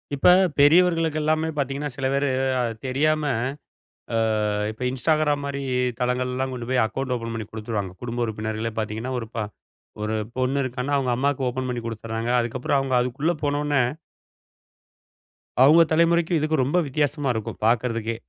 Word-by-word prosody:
இப்ப 135 - +2 0.3
பெரியவர்களுக்கு 165 +1 +4
எல்லாமே 155 +1 +1
பார்த்தீங்கன்னா 140 +1 -2
சில 135 -1 -3
பேரு 140 +1 +1 0.3
அ - - +2 0.2
தெரியாம 155 +4 +1 0.9
அ - - +2 0.5
இப்ப 110 +4 -8
இன்ஸ்டாகிராம் 150 +2 +1
மாரி 140 0 -3 0.4
தளங்கள்லாம் 125 +1 -1
கொண்டு 120 -2 -6
போய் 130 -2 +3
அக்கவுண்ட் 130 +3 -2
ஓப்பன் 115 -1 -4
பண்ணிக் 110 -2 -5
குடுத்துருவாங்க. 110 -3 -4
குடும்ப 120 0 -2
உறுப்பினர்களே, 110 +1 -3
பார்த்தீங்கன்னா 110 +4 -3
ஒரு 115 - -6
ப - - -4 0.7
ஒரு 110 +1 -1 0.2
பொண்ணு 130 +2 +1
இருக்கான்னா 130 +2 -2
அவங்க 130 -2 0
அம்மாவுக்கு 135 +1 0
ஓப்பன் 130 +1 -3
பண்ணிக் 120 -2 -4
கொடுத்துட்றாங்க. 115 +1 -4
அதுக்கப்பறம் 125 +4 0
அவங்க 135 -1 -2
அதுக்குள்ள 125 +7 0
போன 145 0 +1
உடனே 145 -3 +2 1.8
அவுங்க 155 +5 +7
தலைமுறைக்கும் 170 +1 +3
இதுக்கும் 155 -1 +1
ரொம்ப 145 +8 +1
வித்தியாசமா 145 0 0
இருக்கும் 110 -2 -4
பாக்கறதுக்கே. 115 -1 +1
130 Hz, 145 wpm, -24 LUFS, 115-145 Hz, 1.8 s, அவுங்க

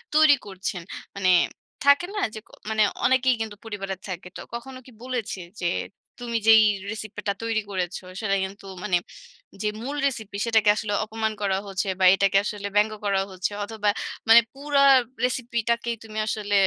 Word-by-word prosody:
তৈরি 310 -2 +7
করছেন, 190 -2 -4 0.3
মানে 190 -2 +1 0.5
থাকে 285 +5 +5
না - - -1
যে 215 - -6
ক - - -25 0.2
মানে 215 -1 +3 0.2
অনেকেই 260 0 +4
কিন্তু 220 -2 -4
পরিবারে 195 -3 -4
থাকে। 180 -1 -6
তো - - -7
কখনো 255 +2 -6
কি 255 - -14
বলেছে 245 -6 -3 0.2
যে, - - -2 0.5
"তুমি 235 -1 -2
যেই 220 -1 +9 0.3
রেসিপি 215 -1 -6
টা 200 - +2
তৈরি 225 -1 0
করেছ, 185 -2 -2 0.3
সেটা 195 -2 +1
কিন্তু 195 +1 -7 0.2
মানে 185 -4 +2 0.6
যে 210 - 0 0.2
মূল 280 +3 -4
রেসিপি 220 -6 -5
সেটাকে 220 -2 +3
আসলে 205 -1 -2
অপমান 220 0 -2
করা 195 -1 +1
হচ্ছে 195 +1 -2
বা 185 - +4
এটাকে 195 0 +3
আসলে 205 -1 -3
ব্যঙ্গ 210 +1 +4
করা 195 -1 +2
হচ্ছে। 185 +2 -2
অথবা 210 -1 -1 0.4
মানে 230 +1 +10
পুরা 280 0 +1 0.4
রেসিপিটাকেই 235 -1 -1
তুমি 215 -1 -9
আসলে 205 -2 -2
215 Hz, 165 wpm, -25 LUFS, 200-235 Hz, 0.6 s, মানে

